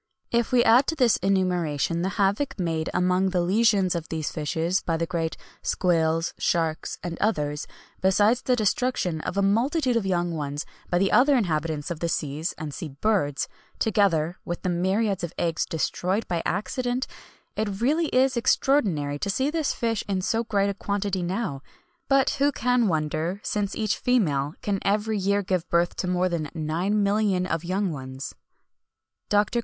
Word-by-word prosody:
If 235 -1 +1
we 245 -1 +5
add 250 +4 +5
to 320 - 0
this 250 -7 +4
enumeration 175 -4 0
the 190 +4 -2
havoc 205 +7 +1
made 165 -3 -1
among 180 +1 +2
the 180 -1 +1
legions 195 0 +3
of 170 -2 -4
these 160 -2 -3
fishes 165 +4 -1
by 165 -1 -1
the 165 - 0
great 165 -1 -2 0.2
squales, 165 -2 +1
sharks, 165 -2 0
and 175 -1 -5
others, 150 -8 0 0.3
besides 205 +6 +3
the 250 - +2
destruction 215 -7 0
of 185 - -4
a 200 - +3
multitude 250 +6 +2
of 220 -4 0
young 175 -2 0
ones 145 -1 -3 0.2
by 175 - +2
the 195 +2 +2
other 275 +2 +5
inhabitants 160 -5 -1
of 165 - -4
the 170 - -1
seas 155 +1 -2
and 150 -2 -6
sea 165 - -5
birds, 145 -1 0 0.3
together 180 -7 +1
with 175 - -5
the 185 - 0
myriads 190 +2 0
of 170 - -4
eggs 165 -2 0
destroyed 185 +5 -1
by 170 -2 -1
accident, 245 +5 -1 0.5
it 205 -2 -2
really 305 +7 +2
is 260 0 +2
extraordinary 195 - +1
to 200 - -2
see 265 +8 +1
this 320 -3 0
fish 225 -3 -1
in 195 -2 0
so 225 +4 +1
great 200 -3 +1
a - - -4
quantity 200 -1 -2
now; 175 -5 -2 0.5
but 275 -1 +4
who 285 +1 +4
can 245 -3 +2
wonder, 160 +2 -1
since 205 -2 -2
each 215 -2 0
female 155 - +1
can 200 -2 0
every 210 +1 0
year 200 +1 +1
give 185 -2 -1
birth 170 0 +2
to 185 - -3
more 180 0 +1
than 170 -4 -2
9,000,000 195 +4 +1
of 165 -2 -2
young 185 +2 -1
ones." 130 -2 -6 1.0
DR. 205 0 +4
190 Hz, 170 wpm, -25 LUFS, 165-220 Hz, 1.0 s, we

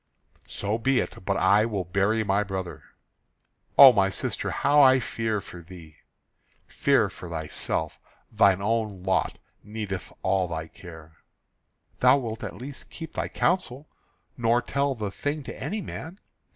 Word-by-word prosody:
"So 105 +3 -3
be 130 +2 +2
it; - - -5
but 100 0 0
I 105 +1 +4
will 100 -5 -2
bury 100 +5 +1
my 100 0 +1
brother." 95 -3 -5 1.0
"O 135 -2 +11
my 95 -2 +3
sister, - - -3
how 145 +1 +3
I 130 -1 +6
fear 110 -2 -2
for 85 -3 -11
thee!" 80 -3 -14 0.7
"Fear - - +2
for 90 - -10
thyself. 80 0 -3 0.3
Thine 100 -3 +3
own 105 -3 -1
lot 95 0 0 0.3
needeth 105 -3 -6
all 95 -1 +1
thy 80 -1 -5
care." 80 -3 -13 0.8
"Thou 125 +2 +6
wilt 115 -4 -5
at - - -6
least 130 +7 -8
keep 165 -1 -9
thy - - -2
counsel, 155 -6 -1 0.5
nor 120 0 +2
tell 140 +3 -1
the 105 -4 -4
thing 145 +8 -3
to - - -8
any 195 +9 -4
man." 165 +4 -8
105 Hz, 150 wpm, -26 LUFS, 95-130 Hz, 1.0 s, O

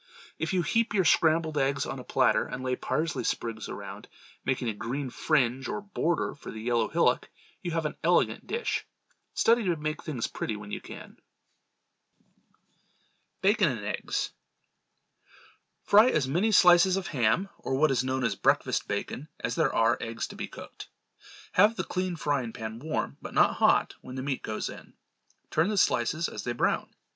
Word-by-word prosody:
If 160 - -1
you 185 -2 +1
heap 225 +5 +1
your 190 -3 +3
scrambled 160 -1 +3
eggs 135 0 +1
on 135 - -5
a - - -8
platter 130 0 +2
and 130 +1 -6
lay 130 0 0
parsley 160 +5 -2
sprigs 115 -2 -3
around, - - -8 0.4
making 130 -2 -1
a 110 - 0
green 130 +5 -4
fringe 130 0 +1
or 210 - -3
border 180 -4 -1
for - - -11
the 110 - -7
yellow 115 0 +1
hillock, - - +1 0.3
you 175 - -3
have 165 -1 -1
an 150 - -2
elegant - - +2
dish. 465 +1 -2 0.5
Study 230 +1 +4
to 175 -2 +2
make 155 0 -3
plain 155 - -6
things 115 - -1
pretty 110 - -3
when 105 0 -9
you - - -4
can. - - -11 2.2
Bacon 200 -3 +4
and 115 -6 -4
Eggs. 105 - -2 1.5
Fry 215 +5 +6
as 150 - +1
many 180 +11 +1
slices 180 -1 +6
of 195 - -3
ham, 135 - +1
or 130 - -2
what 150 +2 +3
is 130 -1 +1
known 130 0 -1
as 115 -4 +1
breakfast - - +1
bacon, 145 - -4
as 120 - -1
there - - +2
are 115 +1 +2
eggs 115 0 -3
to - - -9
be - - -5
cooked. - - -10 0.6
Have 210 +4 +5
the - - -2
clean 185 -1 -2
frying 140 -7 -1
pan 110 0 -6
warm, 155 +4 -3
but - - -8
not - - +4
hot, - - +3
when 130 - -9
the 130 - -4
meat 135 -2 -2
goes 110 - -3
in. - - -10 0.6
Turn 160 +5 +2
the 210 - -1
slices 155 +1 +2
as - - -6
they 120 - -2
brown. 120 - 0
145 Hz, 180 wpm, -28 LUFS, 120-175 Hz, 2.2 s, Fry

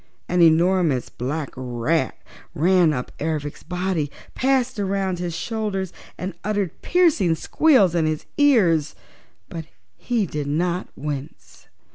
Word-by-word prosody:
An 180 0 +2
enormous 165 -4 +3
black 140 +4 -4
rat 130 +4 -1 0.4
ran 175 +1 +4
up 125 -4 -3
Ervic's 150 -1 -3
body, 180 -4 -2 0.2
passed 260 -3 +1
around 195 -2 -1
his 175 -2 -3
shoulders 205 -5 -3 0.2
and 185 +1 -4
uttered 205 -4 -2
piercing 310 - +3
squeals 215 - +3
in 165 -2 +2
his 155 -1 -2
ears, 180 - +4 0.5
but 165 -2 -7 0.3
he 235 -4 0
did 150 -4 -4
not 175 +5 -1
wince. 145 0 -7
175 Hz, 120 wpm, -23 LUFS, 155-195 Hz, 0.5 s, ran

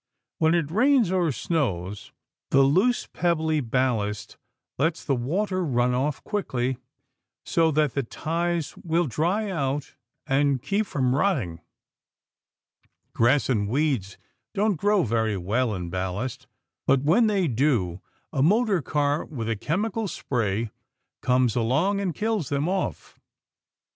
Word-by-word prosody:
When 160 +1 +4
it 160 -3 0
rains 240 - +3
or 180 -4 +2
snows, 105 - -2 0.4
the 135 0 +5
loose 190 - +3
pebbly 160 -3 0
ballast 110 -5 -1 0.4
lets 160 +3 0
the 140 - +1
water 185 +10 -1
run 125 -5 +1
off 135 +3 -1
quickly, 130 - -2 0.7
so 165 -1 +2
that 150 -3 +1
the 140 - 0
ties 165 +5 -2
will 170 +1 0
dry 180 - 0
out 140 -4 -2 0.3
and 140 0 +2
keep 200 - -1
from 130 -3 0
rotting. 130 - 0 1.5
Grass 130 +5 +3
and 105 -6 0
weeds 130 -7 0 0.4
don't 205 0 +2
grow 205 +2 +2
very 110 -3 0
well 105 +5 0
in 90 -2 -5
ballast, 105 +8 -3 0.4
but 135 0 +3
when 215 +10 +4
they 195 -5 +1
do 115 - 0 0.3
a 135 - +1
motor 205 - +3
car 145 +1 0
with 120 -7 -6
a 115 - 0
chemical 205 - -1
spray 115 - -2 0.5
comes 125 -3 +2
along 140 - +1
and 180 -6 -2
kills 215 - -1
them 145 +2 0
off. 190 +1 -3
145 Hz, 130 wpm, -25 LUFS, 120-175 Hz, 1.5 s, the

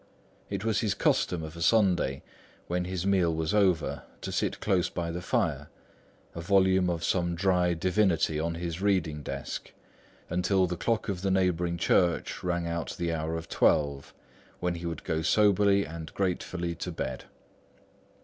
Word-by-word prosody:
It 105 - -3
was 110 -2 +2
his 105 -3 0
custom 85 -4 +1
of 80 +1 -7
a 85 - -8
Sunday, 90 -8 +2 0.4
when 90 +1 -1
this 90 0 -3
meal 95 -4 +3
was 80 +4 -1
over, 95 -6 +2 0.2
to - - -4
sit - - -1
close 90 -2 +1
by 85 -1 -3
the 85 +1 -4
fire, 90 - -1 0.6
a 85 - -6
volume 95 0 +3
of 85 -1 -2
some 85 0 0
dry 90 -1 +2
divinity 85 -3 +1
on 85 +1 -1
his 85 +1 -4
reading 90 -7 +1
desk, 70 -1 -6 0.6
until 90 +2 +2
the 90 0 -3
clock 115 +5 -1
of 95 -4 -3
the 100 - 0
neighbouring 90 -2 +1
church 85 0 +1
rang 85 -1 -1
out 85 0 -3
the 85 -1 -1
hour 80 +1 -2
of 80 - -7
twelve, 70 -2 +1 0.5
when 90 0 0
he 85 0 -5
would 85 -2 -5
go 80 0 -1
soberly 100 +2 +4
and 80 0 -8
gratefully 90 -2 -2
to 85 - -5
bed. 65 -1 -4
85 Hz, 165 wpm, -28 LUFS, 85-95 Hz, 0.6 s, soberly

